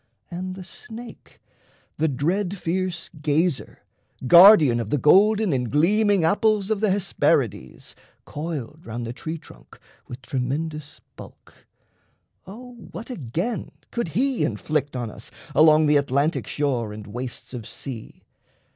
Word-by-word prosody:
And 185 +1 -5
the 190 - -8
Snake, 230 +5 -12 0.6
The 160 - +2
dread 175 +8 -1
fierce 175 -1 -3
gazer, 150 0 -1 0.4
guardian 170 - +8
of 115 -3 -4
the 150 - +1
golden 205 - +4
And 125 -3 -1
gleaming 200 +5 +3
apples 205 +3 +2
of 215 - +1
the 215 0 +1
Hesperides, 185 - -1 0.3
Coiled 155 -1 -6
round 115 +1 -5
the 115 - -5
tree 155 +7 -5
trunk 155 - -17 0.3
with 125 +2 -10
tremendous 150 +3 -4
bulk, - - -14 0.9
O 245 +6 -10 0.2
what, 230 +3 -8
again, 175 - -3 0.2
could 235 -5 -2
he 255 - 0
inflict 140 +6 -2
on 120 -3 -4
us 105 - -10 0.2
Along 155 +1 +6
the 150 0 +4
Atlantic 140 +3 0
shore 125 -7 -1
and 105 -1 -9
wastes 120 +4 -7
of 115 -4 -7
sea? 125 -6 -8
155 Hz, 130 wpm, -23 LUFS, 130-195 Hz, 0.9 s, guardian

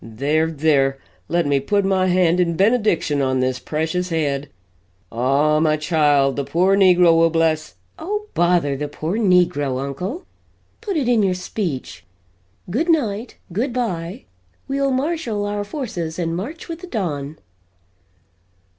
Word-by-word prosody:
There 145 +8 0
there 140 -3 +2 0.3
let 170 +1 +1
me 140 -1 +2
put 200 +8 0
my 190 -1 +2
hand 180 -1 +3
in 170 -2 +1
benediction 200 - +2
on 130 -1 +1
this 130 -1 0
precious 160 +6 -2
head. 145 -4 -1 0.6
Ah, 140 +6 +2
my 155 -1 +2
child, 145 -4 +2
the 140 - 0
poor 175 +8 +2
negro 180 -3 +5
will 165 0 +4
bless 160 -1 0
" - - -25
"Oh 420 +4 -3
bother 170 -5 +2
the 150 +2 -3
poor 160 +8 -3
negro, 175 - +2
uncle! 180 - -5 0.6
Put 405 -6 -2
it 275 -5 0
in 240 -3 +3
your 190 -2 +1
speech. 165 - -5 0.6
Good 265 - -1
night, 235 -8 0 0.2
good 240 +7 -1
bye 185 -8 -3 0.4
we'll 275 0 0
marshal 265 -6 -1
our 205 0 -2
forces 200 - -5
and 165 -2 -2
march 255 - -6
with 330 -1 -6
the 365 - -9
dawn!" 155 - -3
170 Hz, 145 wpm, -21 LUFS, 145-205 Hz, 0.6 s, negro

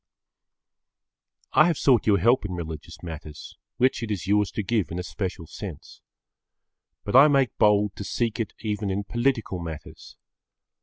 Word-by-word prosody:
I 155 - +6
have 170 -4 0
sought 125 -6 +3
your 100 -2 +5
help 120 +7 +3
in 95 -3 -4
religious 80 -2 -7
matters, 80 -3 -9 0.2
which 130 0 +2
it 115 - -4
is 100 -5 -3
yours 105 0 +2
to 105 - -2
give 105 -1 0
in 85 - -5
a 90 - -3
special 95 -2 -5
sense. - - -9 1.0
But 105 - -3
I 135 +3 +9
make 135 -5 +2
bold 105 -1 +3
to - - -5
seek 115 +2 -2
it 110 -4 -3
even 105 -2 -2
in 100 +1 -1
political 120 -4 -1
matters. 80 -3 -9
105 Hz, 160 wpm, -25 LUFS, 90-120 Hz, 1.0 s, I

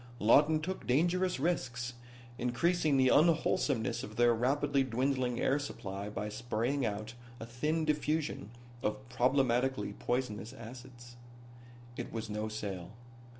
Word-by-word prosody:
Lawton 145 +8 +5
took 185 +5 -5
dangerous 175 +6 +2
risks, 125 -6 -1 0.5
increasing 150 +5 +2
the 130 -1 +5
unwholesomeness 150 -6 +2
of 110 - -8
their 120 0 +5
rapidly 140 +4 +1
dwindling 130 0 0
air 140 +2 +2
supply 100 -8 -5
by 105 0 -4
spraying 120 +5 -1
out 110 0 -3 0.3
a 115 - -6
thin 150 +7 -1
diffusion 150 -7 -1 0.3
of 120 +4 -3
problematically 125 -3 +1
poisonous 120 -2 -2
acids. 120 +1 -11 0.8
It - - -5
was 110 -1 -5
no 105 +1 -2
sale. 100 -4 -5
125 Hz, 120 wpm, -32 LUFS, 110-145 Hz, 0.8 s, Lawton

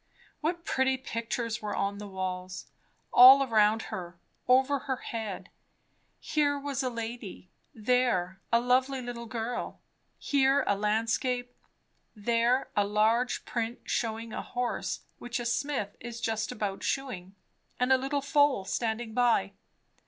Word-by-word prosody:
What 340 +2 -2
pretty 265 0 +1
pictures 230 -2 -3
were 210 -1 -3
on 200 +1 -1
the 210 - -7
walls, 185 -1 -5 0.5
all 265 +3 +10
around 220 -3 +3
her, 175 -1 -6 0.3
over 265 +2 +4
her 265 0 -2
head; 210 -6 -6 0.7
here 290 -2 +1
was 280 -1 -3
a 255 - -1
lady, 230 -6 -7 0.2
there 215 -6 +1
a 235 - +5
lovely 255 +2 +2
little 240 -1 -6
girl; 230 +1 -4 0.4
here 275 0 +2
a 200 - +2
landscape; 230 +4 0 0.6
there 235 +4 +1
a 205 - +4
large 220 +4 +1
print 235 0 -3
shewing 225 -1 -2
a - - -3
horse 245 -1 -3 0.2
which 245 0 -4
a 240 - -4
smith 240 -4 -1
is 235 -1 -7
just 225 -1 -1
about 200 -2 -3
shoeing, 200 -9 -3 0.4
and 250 +1 +4
a - - +6
little 275 +2 -1
foal 280 -7 +3
standing 225 +1 -2
by. 235 - +2
235 Hz, 135 wpm, -29 LUFS, 210-260 Hz, 0.7 s, all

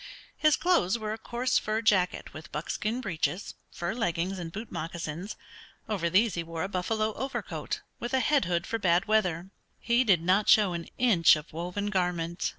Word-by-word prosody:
His 305 -1 +4
clothes 340 - +2
were 215 -1 -3
a - - -5
coarse 240 +3 0
fur 215 +1 -2
jacket 190 -5 +1
with 155 0 -10
buckskin 225 +4 -2
breeches, 185 -1 -2 0.2
fur 175 +3 -3
leggings, 185 -4 -1
and 165 -2 -6
boot 215 +6 -7
moccasins. 165 +3 -5 0.5
Over 190 -6 -1
these 205 +5 +3
he 170 - -2
wore 165 -1 -5
a - - -1
buffalo 215 +3 -1
overcoat, 265 +4 -4 0.2
with 240 +2 -2
a - - +3
head 285 - +2
hood 170 0 0
for 225 - -2
bad 180 -2 +3
weather. 190 -4 +1 0.3
He 235 +2 +2
did 190 -8 +3
not 190 +4 +3
show 205 -4 +6
an 170 -1 -5
inch 210 -12 +5
of 150 0 -8
woven 180 +5 -3
garment. 175 -3 -1
190 Hz, 180 wpm, -28 LUFS, 170-220 Hz, 0.5 s, show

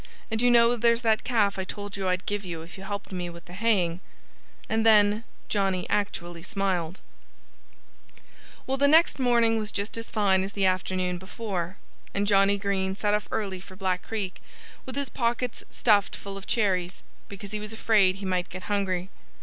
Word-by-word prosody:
"And 220 0 0
you 245 - +5
know 235 0 +6
there's 235 +1 +3
that 220 -1 +2
calf 210 -6 +1
I - - -1
told 205 +1 -6
you 195 -1 -2
I'd 180 0 0
give 205 0 -2
you 170 -3 -6
if 170 - -11
you 190 - -10
helped 200 0 -5
me 180 -2 -3
with 170 0 -11
the 175 - -12
haying." 185 -5 +1 0.7
And 220 0 +1
then 210 0 +5 0.2
Johnnie 195 -3 0
actually 175 -4 -2
smiled. 190 -3 -2 1.6
Well, 265 +1 -1
the 285 +1 +4
next 320 0 +5
morning 235 -3 +3
was 215 -1 -3
just 200 +3 -3
as 230 - -7
fine 195 -3 +2
as 195 +1 -5
the 200 -1 +1
afternoon 185 -1 0
before. 190 -2 -4 0.4
And 200 +1 +1
Johnnie 200 0 +4
Green 195 -1 -1
set 205 +1 0
off 210 0 0
early 195 -4 -2
for 185 +1 -13
Black 185 -1 -1
Creek, 205 -5 -4 0.5
with 260 - -5
his 280 -1 -1
pockets 240 0 -2
stuffed 205 -4 +3
full 200 0 -7
of 195 0 -9
cherries, 185 -5 0 0.3
because 200 0 -8
he 210 - -2
was 210 0 -5
afraid 210 -4 +3
he 195 0 -7
might 185 -1 -1
get 185 0 -7
hungry. 190 -3 -1
200 Hz, 185 wpm, -27 LUFS, 185-220 Hz, 1.6 s, know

